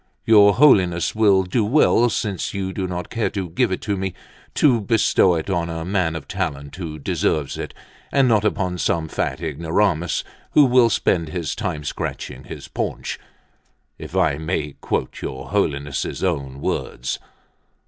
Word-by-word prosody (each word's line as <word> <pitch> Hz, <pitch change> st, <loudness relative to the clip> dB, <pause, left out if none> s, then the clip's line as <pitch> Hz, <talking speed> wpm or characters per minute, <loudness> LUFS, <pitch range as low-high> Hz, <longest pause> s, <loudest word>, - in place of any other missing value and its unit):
Your 105 Hz, -2 st, +6 dB
Holiness 95 Hz, -, +4 dB
will 100 Hz, -3 st, +4 dB
do 95 Hz, +5 st, 0 dB
well, 120 Hz, 0 st, +4 dB
since 100 Hz, -3 st, -2 dB
you 95 Hz, -1 st, -3 dB
do 95 Hz, -1 st, -2 dB
not 90 Hz, 0 st, -5 dB
care 115 Hz, -2 st, 0 dB
to 95 Hz, -4 st, -4 dB
give 85 Hz, -, +1 dB
it 95 Hz, -, -4 dB
me, 95 Hz, -2 st, -2 dB, 0.4 s
to 125 Hz, -7 st, +4 dB
bestow 100 Hz, -4 st, +3 dB
it 80 Hz, -, -3 dB
on 85 Hz, -4 st, -1 dB
a 80 Hz, 0 st, -4 dB
man 90 Hz, -4 st, 0 dB
of 80 Hz, -, -7 dB
talent 75 Hz, -8 st, -4 dB
who 80 Hz, -4 st, -5 dB
deserves 70 Hz, 0 st, -1 dB
it, -, -, -5 dB, 0.4 s
and 135 Hz, -2 st, +4 dB
not 110 Hz, -4 st, +3 dB
upon 90 Hz, -4 st, -1 dB
some 80 Hz, -1 st, 0 dB
fat 80 Hz, -, -3 dB
ignoramus 85 Hz, +2 st, 0 dB, 0.3 s
who 150 Hz, -, +7 dB
will 125 Hz, -2 st, +5 dB
spend 85 Hz, -6 st, +1 dB
his 80 Hz, -3 st, -3 dB
time 90 Hz, -9 st, -3 dB
scratching 65 Hz, -2 st, -5 dB
his -, -, -9 dB
paunch, -, -, -4 dB, 0.8 s
if -, -, -8 dB
I 70 Hz, -, +2 dB
may 80 Hz, -2 st, -2 dB
quote -, -, -2 dB
your 65 Hz, 0 st, -6 dB
holiness' 70 Hz, -10 st, -1 dB
own 70 Hz, -7 st, -2 dB
words. 60 Hz, +1 st, -3 dB
90 Hz, 160 wpm, -22 LUFS, 80-105 Hz, 0.8 s, who